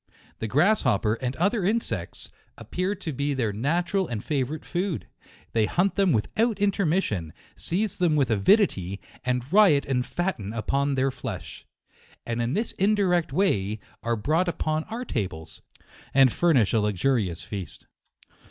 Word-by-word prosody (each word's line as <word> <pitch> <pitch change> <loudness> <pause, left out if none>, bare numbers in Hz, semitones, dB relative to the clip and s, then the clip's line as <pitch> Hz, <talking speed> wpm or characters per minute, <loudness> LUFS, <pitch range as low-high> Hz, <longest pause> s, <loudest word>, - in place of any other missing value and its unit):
The 110 - -2
grasshopper, 140 - +3
and 125 +2 -3
other 200 +4 +1
insects, 225 +5 -2 0.3
appear 185 +3 -2
to 170 -6 -5
be 140 +2 -1
their 115 -6 -1
natural 175 - 0
and 110 -3 -4
favourite 145 +1 -2
food; 180 -1 -2 0.5
they 110 -2 +2
hunt 190 +3 +1
them 195 -3 +3
without 215 - +1
intermission, 180 - 0 0.2
seize 195 +3 -2
them 170 -4 +3
with 140 -5 +2
avidity, 100 - +2 0.2
and 125 -1 -1
riot 190 -9 +6
and 130 -2 0
fatten 150 - -3
upon 140 +5 0
their 135 +1 +1
flesh. 125 -7 -7 0.6
And 120 0 -2
in 120 +2 -1
this 220 +5 0
indirect 190 -4 +2
way, 110 - +1 0.2
are 120 0 0
brought 155 - +1
upon 155 -2 -1
our 235 +4 -5
tables, 90 - -4 0.5
and 135 -2 +6
furnish 145 - +3
a 115 - +4
luxurious 105 -2 0
feast. 100 -4 -7
140 Hz, 145 wpm, -26 LUFS, 115-185 Hz, 0.6 s, riot